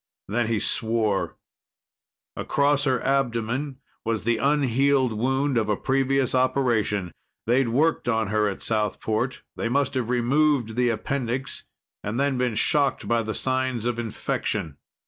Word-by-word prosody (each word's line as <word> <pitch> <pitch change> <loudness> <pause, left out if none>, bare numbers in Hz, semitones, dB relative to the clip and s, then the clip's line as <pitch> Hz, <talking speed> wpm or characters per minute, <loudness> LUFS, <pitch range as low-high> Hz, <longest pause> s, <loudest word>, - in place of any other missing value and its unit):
Then 115 +3 0
he 115 -2 0
swore. 110 -3 0 1.0
Across 145 0 +1
her 130 -2 +1
abdomen 130 +1 -1 0.3
was 115 -3 -1
the 115 +1 +1
unhealed 135 -1 +2
wound 130 +3 +1
of 110 -1 -2
a 105 - +1
previous 135 0 +1
operation. 120 -8 +1 0.3
They'd 120 +1 +2
worked 145 +1 +1
on 110 -3 +1
her 105 0 +2
at 100 - -4
Southport. 110 +3 -1
They 115 - -1
must 140 +2 +1
have 125 -3 -2
removed 125 -1 +2
the 125 0 +2
appendix 125 +3 -3 0.4
and 105 +4 -3
then 140 -2 +1
been 125 -3 0
shocked 140 +5 +1
by 115 0 +2
the 110 -1 -4
signs 130 -3 -1
of 120 -1 -1
infection. 90 -8 -3
120 Hz, 140 wpm, -25 LUFS, 110-135 Hz, 1.0 s, unhealed